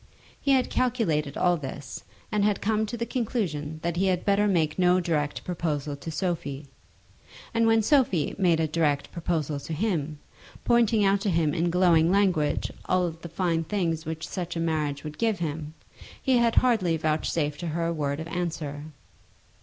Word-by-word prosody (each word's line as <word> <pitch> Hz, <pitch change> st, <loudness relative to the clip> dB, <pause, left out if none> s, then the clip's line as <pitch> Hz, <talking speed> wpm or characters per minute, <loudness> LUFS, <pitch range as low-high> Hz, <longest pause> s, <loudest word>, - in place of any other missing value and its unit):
He 280 Hz, -, +3 dB
had 260 Hz, -1 st, +2 dB
calculated 165 Hz, -, 0 dB
all 175 Hz, -1 st, +3 dB
this, 140 Hz, -2 st, -7 dB, 0.3 s
and 210 Hz, -2 st, +1 dB
had 205 Hz, -1 st, +2 dB
come 220 Hz, +1 st, 0 dB
to 235 Hz, -, -5 dB
the 235 Hz, -, -2 dB
conclusion 180 Hz, -, -2 dB
that 170 Hz, 0 st, -1 dB
he 190 Hz, +2 st, +2 dB
had 180 Hz, -2 st, 0 dB
better 205 Hz, +1 st, +3 dB
make 165 Hz, -4 st, +1 dB
no 180 Hz, 0 st, +4 dB
direct 155 Hz, -5 st, -1 dB
proposal 155 Hz, -5 st, -2 dB
to 140 Hz, +3 st, -8 dB
Sophie; 155 Hz, -4 st, -3 dB, 0.9 s
and 230 Hz, 0 st, +3 dB
when 225 Hz, -1 st, +4 dB
Sophie 225 Hz, -, +2 dB
made 175 Hz, -4 st, +3 dB
a 160 Hz, -, +1 dB
direct 150 Hz, -3 st, 0 dB
proposal 160 Hz, -4 st, -2 dB
to 160 Hz, -, -6 dB
him, 155 Hz, -5 st, -1 dB, 0.5 s
pointing 230 Hz, -3 st, +3 dB
out 195 Hz, 0 st, +3 dB
to 205 Hz, -, 0 dB
him 165 Hz, -4 st, +1 dB
in 170 Hz, +1 st, +1 dB
glowing 170 Hz, -2 st, +4 dB
language 185 Hz, -7 st, +1 dB
all 180 Hz, -2 st, +1 dB
the 165 Hz, +1 st, -10 dB
fine 165 Hz, -1 st, 0 dB
things 165 Hz, -3 st, -1 dB
which 160 Hz, 0 st, -5 dB
such 175 Hz, -3 st, -4 dB
a -, -, -2 dB
marriage 155 Hz, -4 st, -1 dB
would 150 Hz, -1 st, -8 dB
give 225 Hz, -3 st, +1 dB
him, 155 Hz, -2 st, -4 dB, 0.4 s
he 260 Hz, -2 st, +2 dB
had 235 Hz, -1 st, +2 dB
hardly 210 Hz, -10 st, +3 dB
vouchsafed 155 Hz, -1 st, -1 dB
to 175 Hz, -, -4 dB
her 165 Hz, +1 st, -1 dB
a 170 Hz, -, 0 dB
word 145 Hz, -2 st, -2 dB
of 160 Hz, -, -5 dB
answer. 160 Hz, -4 st, -4 dB
170 Hz, 175 wpm, -26 LUFS, 155-200 Hz, 0.9 s, no